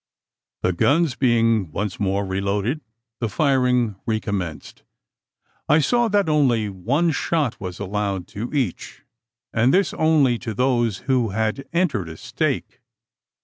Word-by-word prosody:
The 90 - +2
guns 145 - +2
being 115 - +2
once 100 +4 -3
more 100 0 0
reloaded, 100 +8 -1 0.4
the 115 - -1
firing 125 - +2
recommenced, 100 -7 -3 0.9
I 150 - +6
saw 240 +9 +2
that 205 -3 +2
only 130 -9 +2
one 130 - 0
shot 150 -4 -1
was 90 -2 -5
allowed 100 -2 -2
to 110 +4 -5
each; 130 - -3 0.5
and 120 +3 +3
this 195 +4 +2
only 150 -7 +3
to 115 -4 -5
those 120 -4 +1
who 130 -4 +2
had 110 +5 -1
entered 145 - 0
a 80 - -9
stake. - - -3
115 Hz, 130 wpm, -22 LUFS, 100-140 Hz, 0.9 s, I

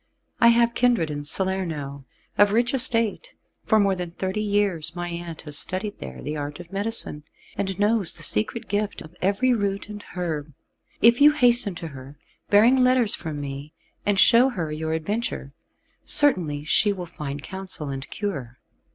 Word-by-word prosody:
I 235 - +5
have 235 0 +3
kindred 235 -11 +1
in 145 0 -6
Salerno, 160 -6 -3 0.3
of 205 0 +4
rich 240 +4 +1
estate. 240 - +5 0.3
For 220 - +3
more 200 -1 +2
than 180 -1 -5
thirty 190 +4 -4
years 200 -6 -1
my 175 0 -5
aunt 170 -1 -7
has 150 -2 -4
studied 200 +3 -4
there 65 -1 -9
the 150 - -4
art 145 +1 -6
of 175 +1 -12
medicine, 200 -6 -3 0.3
and 195 -1 -4
knows 205 -3 +1
the 165 - -6
secret 110 - 0
gift 205 0 -3
of 160 +2 -15
every 205 +7 +1
root 200 -2 -3
and 210 -1 -8
herb. 155 -5 -4 0.5
If 235 +3 +5
you 295 +1 +7
hasten 240 - +2
to 165 -1 -7
her, 140 0 -12 0.3
bearing 240 +6 +5
letters 250 -3 +3
from 155 -2 -5
me, 140 +2 -7 0.3
and 205 -1 0
show 240 +6 +6
her 170 -11 -4
your 160 +1 -3
adventure, 160 -4 -4 0.5
certainly 170 - +5
she 205 +7 +2
will 185 -3 -5
find 145 -4 -7
counsel 190 -5 -4
and 135 0 -7
cure. 140 - -5
190 Hz, 170 wpm, -23 LUFS, 150-215 Hz, 0.5 s, you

